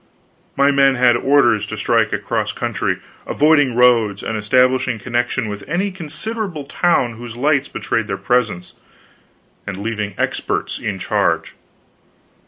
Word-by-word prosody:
My 140 +1 +4
men 135 -1 +4
had 120 -1 +4
orders 120 -5 +3
to 110 - -6
strike 110 0 +1
across - - -2
country, - - -2 0.3
avoiding 145 -4 +3
roads, 115 -5 +3
and 115 - -3
establishing 125 +3 +2
connection 120 +1 -2
with 105 -1 -6
any 190 +5 0
considerable 180 +1 -5
towns 135 -6 0
whose 120 -1 -8
lights 140 +1 +1
betrayed 115 -2 -2
their 95 - -3
presence, 105 -3 -1 0.9
and 100 -1 -4
leaving 105 -1 -4
experts - - -2
in - - -3
charge. - - 0
125 Hz, 130 wpm, -19 LUFS, 110-140 Hz, 0.9 s, My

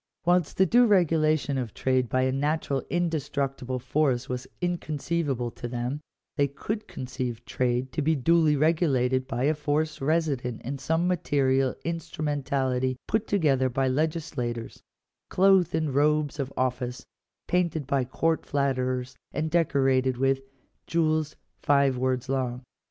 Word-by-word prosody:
Whilst 175 -2 +2
the 190 - +5
due 240 +6 +5
regulation 155 -7 +2
of 120 -5 -5
trade 130 -2 +1
by 130 +2 +1
a 130 - +2
natural 140 0 0
indestructible 140 -6 -1
force 130 0 0
was 125 0 -4
inconceivable 155 -7 -2
to 120 - -7
them, 125 +4 -3 0.4
they 140 - +3
could 210 +10 -5
conceive 125 -2 -5
trade 125 +1 -1
to - - -2
be 160 +2 +2
duly 155 +2 +3
re 155 +3 +4
gulated 130 -5 +1
by 120 +2 -2
a 150 +3 +3
force 150 0 -1
resident 140 -6 0
in 135 +2 -4
some 165 +4 0
material 135 -6 +1
instrumentality 140 -5 -1
put 220 0 0
together 140 -9 +2
by 130 +2 0
legislators, 130 -5 -2 0.5
clothed 185 -3 +4
in 160 -1 +1
the 145 - -2
robes 150 +1 +1
of 135 -1 -2
office, 125 0 -2 0.4
painted 170 -4 0
by 135 0 +1
court 160 +6 0
flatterers, 130 -2 -1 0.2
and 155 0 -2
decorated 135 -6 +2
with 135 +1 +1 0.5
"jewels 155 -2 +1 0.2
five 140 -2 +3
words 130 0 -1
long." 130 -1 -2
140 Hz, 140 wpm, -27 LUFS, 130-160 Hz, 0.5 s, the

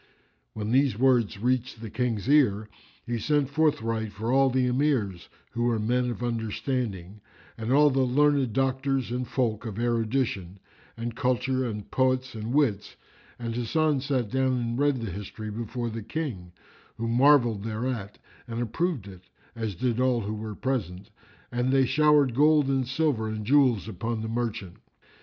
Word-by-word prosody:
When 105 +1 -4
these 130 -3 +3
words 120 -5 +3
reached 125 +2 -1
the 110 -2 -8
King's 115 -2 -2
ear, 110 -8 +3 0.4
he 120 -1 -2
sent 145 +3 +1
forthright 115 -8 0
for 110 +5 -2
all 135 0 +5
the 130 0 +1
Emirs, 125 - 0 0.2
who 120 0 -1
were 120 -2 +2
men 125 +3 0
of 120 0 -5
understanding, 110 -4 -3 0.3
and 115 +2 -4
all 145 +2 +5
the 135 0 +2
learned 140 0 +2
doctors 135 0 0
and 125 0 -2
folk 115 -4 -1
of 110 -4 -6
erudition 115 -5 -1 0.4
and 115 0 -4
culture 130 +1 0
and 105 -3 -6
poets 130 0 +1
and 110 +1 -5
wits; 125 -8 +1 0.4
and 115 -1 -4
Hasan 145 +5 +1
sat 130 -6 -1
down 130 -1 +1
and 120 0 -2
read 145 -3 +2
the 110 -4 -4
history 105 +3 -7
before 115 +2 -4
the 115 +1 -5
King, 110 - -5 0.5
who 115 - -3
marvelled 120 -3 +4
thereat 110 -2 -4 0.3
and 115 0 -4
approved 125 - -2
it, 95 -3 -11 0.3
as 110 -4 -3
did 120 +5 -1
all 125 -2 +2
who 105 +1 -4
were 110 0 -6
present, 105 -6 -3 0.4
and 125 +1 0
they 135 -1 +4
showered 150 -1 +4
gold 150 +1 +4
and 135 -2 0
silver 130 -5 0
and 110 -1 -4
jewels 125 -5 +3
upon 110 +2 -3
the - - -3
Merchant. 115 -6 -3
120 Hz, 160 wpm, -27 LUFS, 110-130 Hz, 0.5 s, all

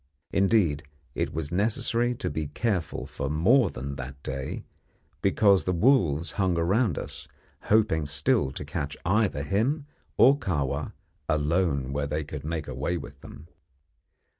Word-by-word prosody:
Indeed, 95 -7 +3 0.3
it - - -1
was 75 -1 -4
necessary 115 +5 +1
to 130 - -3
be 80 -2 -2
careful 90 +1 -2
for 70 -1 -4
more 100 - +4
than 70 0 -6
that 65 +1 -8
day, 65 0 -4 0.6
because 100 -5 +4
the 90 - +1
wolves 85 - +3
hung 90 -3 +2
around 95 - +2
us, - - -6 0.4
hoping 100 -9 +2
still 70 -1 +1
to - - -6
catch 70 +1 -4
either 95 -6 +1
him 125 - 0 0.3
or 140 +3 +6
Kahwa 70 - -2 0.4
alone 75 -3 +1
where 70 0 -1
they 75 +2 -2
could 75 0 -7
make 80 -1 -3
away 65 +8 -2
with 70 -3 -10
them. 75 +3 -12
80 Hz, 140 wpm, -27 LUFS, 70-100 Hz, 0.6 s, or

